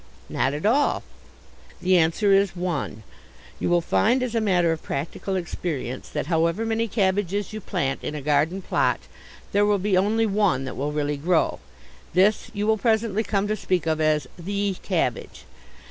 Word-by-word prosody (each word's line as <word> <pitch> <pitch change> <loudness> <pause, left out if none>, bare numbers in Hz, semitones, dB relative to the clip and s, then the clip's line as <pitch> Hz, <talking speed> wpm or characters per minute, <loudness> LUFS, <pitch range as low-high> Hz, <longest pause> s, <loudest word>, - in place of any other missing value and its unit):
Not 135 +3 0
at 150 - -4
all. 275 +7 +2 0.8
The 185 +1 +3
answer 175 +5 +3
is 195 -1 +3
one. 170 -11 -3 0.6
You - - -1
will 175 0 +3
find 240 +9 +2
as 245 -2 -3
a 230 - +1
matter 180 -5 +2
of 160 - -3
practical 165 +7 -4
experience 155 -8 -4
that - - -3
however 170 +6 +1
many 225 0 0
cabbages 200 -1 0
you 215 - -5
plant 165 -9 -2
in 150 - -4
a 150 - -4
garden 150 +6 +1
plot - - +1 0.5
there 205 +1 +3
will 205 0 +3
be 195 0 0
only 215 +4 +2
one 195 -10 +1
that 130 - -6
will 145 +2 -2
really 145 -1 -1
grow. 165 +3 +1 0.6
This 200 +4 +3
you 205 0 -2
will 220 0 +2
presently 220 -2 +1
come 205 -1 0
to 215 - 0
speak 185 -5 -1
of 160 -1 0
as 155 -2 +2 0.2
_the 200 +2 -1
_cabbage. 160 - -2
185 Hz, 175 wpm, -24 LUFS, 155-205 Hz, 0.8 s, The